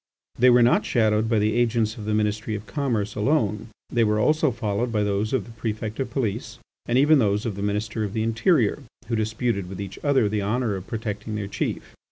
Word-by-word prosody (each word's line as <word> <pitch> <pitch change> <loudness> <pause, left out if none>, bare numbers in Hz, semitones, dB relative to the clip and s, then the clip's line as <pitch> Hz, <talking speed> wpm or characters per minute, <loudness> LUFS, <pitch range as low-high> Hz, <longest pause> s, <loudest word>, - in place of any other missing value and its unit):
They 125 +1 +6
were 120 0 +6
not 120 - +4
shadowed 110 -1 +1
by 115 - +2
the 105 +1 +2
agents 115 -2 +1
of 105 - -8
the 105 0 0
Ministry 110 +1 -1
of 105 +1 -6
Commerce 115 -9 -2
alone. 105 -2 0 0.2
They 120 - +3
were 105 -1 +2
also 155 +6 +3
followed 115 0 -2
by 105 -2 +1
those 105 +1 -1
of 130 -7 0
the 115 - -12
Prefect 110 0 -4
of 130 -2 -2
Police, 120 -6 -3 0.3
and 120 - +2
even 150 +2 +5
by 115 - +3
those 105 +2 0
of 110 -4 -2
the 100 - -6
Minister 105 +2 -2
of 100 -2 -4
the 110 - 0
Interior, 115 - +2 0.3
who 115 - +1
disputed 110 -3 -1
with 95 - -7
each 100 -1 -6
other 140 -7 +3
the 105 0 -1
honour 110 +1 0
of 95 0 -7
protecting 110 -2 -4
their 105 -1 -3
chief. 100 - -4
110 Hz, 225 wpm, -24 LUFS, 105-120 Hz, 0.3 s, They